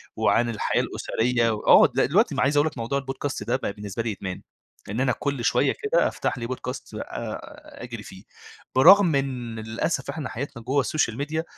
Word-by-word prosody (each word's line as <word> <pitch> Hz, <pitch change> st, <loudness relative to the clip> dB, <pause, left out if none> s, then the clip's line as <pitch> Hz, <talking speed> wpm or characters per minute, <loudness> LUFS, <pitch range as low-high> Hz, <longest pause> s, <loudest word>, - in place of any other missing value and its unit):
وعن 120 Hz, +1 st, +2 dB
الحياة 110 Hz, -, 0 dB
الأسرية، 115 Hz, 0 st, 0 dB, 0.2 s
آه -, -, +8 dB
د -, -, +1 dB
دلوقتي -, -, +2 dB
عايز 140 Hz, +3 st, +2 dB
أقول 145 Hz, +2 st, +4 dB
لك 155 Hz, -, -6 dB
موضوع 115 Hz, +4 st, -1 dB
ال 135 Hz, -, -11 dB
podcast 140 Hz, 0 st, -4 dB
ده 120 Hz, -, +1 dB
بقى 130 Hz, -, -3 dB
بالنسبة 105 Hz, +2 st, -5 dB
لي 115 Hz, -, -2 dB
بقى 105 Hz, -, -4 dB
إدمان، 95 Hz, -2 st, -5 dB, 0.5 s
لإن 105 Hz, +5 st, -3 dB
أنا 130 Hz, -1 st, +2 dB
كل 140 Hz, -4 st, -3 dB
شوية -, -, +2 dB
كده -, -, +3 dB
أفتح -, -, -2 dB
لي 115 Hz, -, -4 dB
Podcast 125 Hz, 0 st, -5 dB
آآ -, -, -7 dB
أجري 120 Hz, -3 st, -7 dB
فيه، 95 Hz, 0 st, -12 dB, 0.5 s
برغم 170 Hz, +4 st, +7 dB
إن 125 Hz, -5 st, -2 dB
للأسف 115 Hz, +6 st, -2 dB
إحنا 140 Hz, -2 st, -4 dB
حياتنا 120 Hz, 0 st, -6 dB
جوا 135 Hz, +4 st, +1 dB
السوشيال 130 Hz, -7 st, 0 dB
ميديا 155 Hz, +3 st, -2 dB
125 Hz, 190 wpm, -25 LUFS, 115-140 Hz, 0.5 s, آه